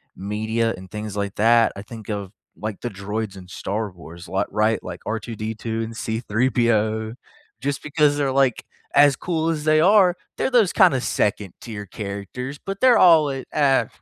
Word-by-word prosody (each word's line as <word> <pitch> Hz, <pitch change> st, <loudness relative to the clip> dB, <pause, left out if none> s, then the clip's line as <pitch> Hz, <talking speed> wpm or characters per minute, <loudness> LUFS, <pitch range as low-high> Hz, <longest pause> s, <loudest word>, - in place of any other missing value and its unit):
media 110 Hz, +3 st, -1 dB
and 95 Hz, 0 st, -12 dB
things 105 Hz, -1 st, -6 dB
like 100 Hz, -1 st, -3 dB
that, 115 Hz, +1 st, +4 dB
I 100 Hz, -, -7 dB
think 110 Hz, 0 st, -11 dB
of, 100 Hz, -2 st, -4 dB, 0.3 s
like, 110 Hz, -1 st, -5 dB
the 120 Hz, -, -3 dB
droids 100 Hz, +1 st, -5 dB
in 90 Hz, -, -11 dB
Star 100 Hz, +3 st, -4 dB
Wars, 85 Hz, 0 st, -12 dB
li 95 Hz, -, 0 dB
right, 110 Hz, +2 st, +1 dB
like -, -, -7 dB
R2-D2 110 Hz, +1 st, -4 dB
and 115 Hz, 0 st, -7 dB
C-3PO, 110 Hz, -1 st, 0 dB, 0.5 s
just 140 Hz, +1 st, -2 dB
because 150 Hz, -1 st, +2 dB
they're, 140 Hz, -2 st, 0 dB
like, 135 Hz, -3 st, +1 dB, 0.3 s
as 145 Hz, -2 st, +6 dB
cool 165 Hz, -2 st, -1 dB
as 155 Hz, -2 st, -2 dB
they 155 Hz, 0 st, +4 dB
are, 190 Hz, -1 st, +5 dB, 0.2 s
they're -, -, 0 dB
those 230 Hz, -8 st, +4 dB
kinda 140 Hz, -10 st, +4 dB
2nd 105 Hz, -5 st, -1 dB
tier 105 Hz, -3 st, -7 dB
characters 105 Hz, +8 st, -6 dB
but 195 Hz, 0 st, -4 dB
they're 255 Hz, -2 st, +6 dB
all 165 Hz, -5 st, +6 dB
in 135 Hz, -1 st, -4 dB
ah 135 Hz, -6 st, +3 dB
115 Hz, 170 wpm, -22 LUFS, 105-140 Hz, 0.5 s, as